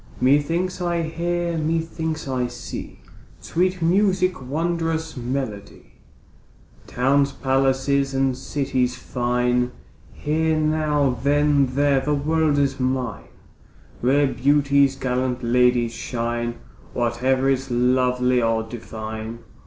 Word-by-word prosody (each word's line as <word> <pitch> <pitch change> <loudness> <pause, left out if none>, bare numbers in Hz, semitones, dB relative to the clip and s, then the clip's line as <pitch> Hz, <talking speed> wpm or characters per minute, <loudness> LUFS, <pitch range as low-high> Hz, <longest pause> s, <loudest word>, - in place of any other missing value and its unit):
Methinks 165 +8 +1
I 170 -1 0
hear, 170 +1 -2
methinks 160 -1 -2
I 130 -2 -1
see, 120 0 -8 0.4
Sweet 180 0 -1
music, 185 -1 +2
wondrous 160 +3 -2
melody, 120 -5 -5 0.9
Towns, 140 +3 +2
palaces, 135 +1 +1
and 135 -1 +1
cities 130 -1 -1
fine; 125 0 0 0.4
Here 160 +1 0
now, 155 -4 +1
then 145 -2 +2
there; 140 -1 +3
the 145 +3 0
world 155 +1 +1
is 140 -1 +1
mine, 130 -3 -2 0.7
Rare 140 +4 +3
beauties, 140 0 +3
gallant 125 -1 -2
ladies 120 -1 +3
shine, 120 0 -3 0.4
Whate'er 125 +3 +1
is 135 0 0
lovely 125 0 +2
or 115 -1 +1
divine. 110 0 -7
135 Hz, 100 wpm, -22 LUFS, 125-155 Hz, 0.9 s, there